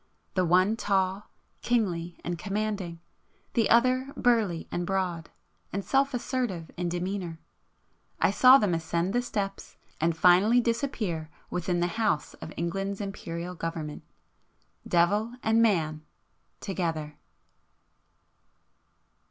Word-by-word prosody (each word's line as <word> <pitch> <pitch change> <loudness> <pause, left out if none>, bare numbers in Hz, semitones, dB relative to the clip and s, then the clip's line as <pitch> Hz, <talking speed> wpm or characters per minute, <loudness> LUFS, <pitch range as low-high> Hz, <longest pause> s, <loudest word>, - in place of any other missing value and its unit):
the 185 - +2
one 185 +5 +4
tall, 195 -2 0 0.3
kingly 175 -8 -1
and 175 -1 -3
commanding,... 200 -3 -3 0.5
the 230 -3 +2
other 255 +3 +3
burly 220 -9 +2
and 175 - -1
broad, 180 -4 -1 0.4
and 195 +1 -3
self 275 0 +2
assertive 235 -10 -2
in 175 0 -2
demeanour;—I 175 -1 -5
saw 255 +1 +8
them 205 -9 +1
ascend 170 +3 -1
the 245 - +2
steps, 200 -5 -4 0.2
and 165 +1 +1
finally 185 +8 +5
disappear 230 - -1 0.2
within 175 0 -1
the 175 +6 -1
House 200 -9 0
of 160 - -7
England's 195 +4 -2
Imperial 180 -3 -5
Government,—Devil 170 +5 -3
and 225 +1 +3
Man,—together! 160 -3 -3
185 Hz, 105 wpm, -28 LUFS, 170-220 Hz, 0.5 s, saw